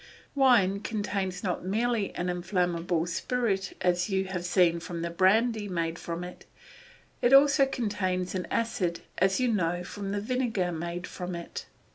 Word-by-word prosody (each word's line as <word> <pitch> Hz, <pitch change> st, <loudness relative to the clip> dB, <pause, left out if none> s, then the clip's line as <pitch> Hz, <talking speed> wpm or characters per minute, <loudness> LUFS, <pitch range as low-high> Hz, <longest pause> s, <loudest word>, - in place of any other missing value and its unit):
Wine 240 Hz, -8 st, +4 dB
contains 200 Hz, -3 st, -3 dB
not 180 Hz, -3 st, -2 dB
merely 220 Hz, +2 st, 0 dB
an 175 Hz, -, -2 dB
inflammable 175 Hz, -2 st, 0 dB
spirit 195 Hz, +1 st, -1 dB
as 180 Hz, +1 st, +1 dB
you 190 Hz, -1 st, +1 dB
have 185 Hz, -2 st, -4 dB
seen 175 Hz, -2 st, +3 dB
from 170 Hz, 0 st, -5 dB
the 170 Hz, -, -2 dB
brandy 210 Hz, +5 st, +3 dB
made 170 Hz, -3 st, -2 dB
from 170 Hz, +1 st, -5 dB
it; 180 Hz, 0 st, -10 dB, 0.7 s
it 245 Hz, -, +4 dB
also 275 Hz, 0 st, +6 dB
contains 190 Hz, -7 st, -2 dB
an 185 Hz, -2 st, -3 dB
acid 185 Hz, -7 st, -1 dB, 0.2 s
as 190 Hz, +3 st, +3 dB
you 255 Hz, -, +2 dB
know 175 Hz, -5 st, 0 dB
from 195 Hz, +2 st, -6 dB
the 205 Hz, -, -1 dB
vinegar 225 Hz, -5 st, -1 dB
made 170 Hz, +2 st, -4 dB
from 180 Hz, -1 st, -6 dB
it. 170 Hz, 0 st, -7 dB
185 Hz, 155 wpm, -28 LUFS, 175-215 Hz, 0.7 s, also